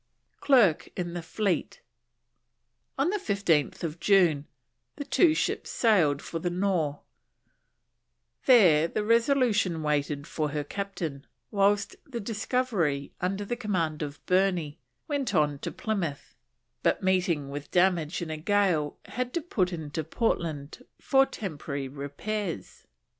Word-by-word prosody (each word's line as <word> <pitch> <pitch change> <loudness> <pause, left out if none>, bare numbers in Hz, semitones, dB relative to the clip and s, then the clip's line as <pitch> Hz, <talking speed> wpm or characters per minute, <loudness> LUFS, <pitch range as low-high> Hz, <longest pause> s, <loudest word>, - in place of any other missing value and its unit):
CLERKE 235 - +4
IN 175 -1 -3
THE 175 - -4
FLEET. 175 +2 -2 1.2
On 295 +8 +1
15th 175 - 0
June 170 -8 +3 0.5
the - - -5
two 320 0 +4
ships - - -1
sailed 170 - +3
for 165 - -4
the 175 - -1
Nore; 175 -5 0 1.5
there 175 - +6
the 210 - -2
Resolution 230 - +2
waited 145 -1 -1
for 155 -1 -2
her 145 0 -2
Captain, 165 -5 -5 0.2
whilst 200 0 +2
the 255 -5 -6
Discovery, 205 - -1
under 195 +3 -1
the 240 - -2
command 180 -10 -1
of 145 -1 -6
Burney, 180 -5 +1 0.3
went 280 -8 -1
on 150 -3 +2
to - - -4
Plymouth, 180 -10 -3 0.5
but, - - +1
meeting 180 -7 +1
with 145 +1 -6
damage 175 -2 +2
in 160 - -5
a 155 - -3
gale, 175 -4 +1
had 250 0 -3
to 340 - +1
put 190 - 0
into 160 -2 -4
Portland 160 - -2 0.2
for 270 -1 +3
temporary 145 -7 -5
repairs. 145 - -5
180 Hz, 125 wpm, -28 LUFS, 150-210 Hz, 1.5 s, there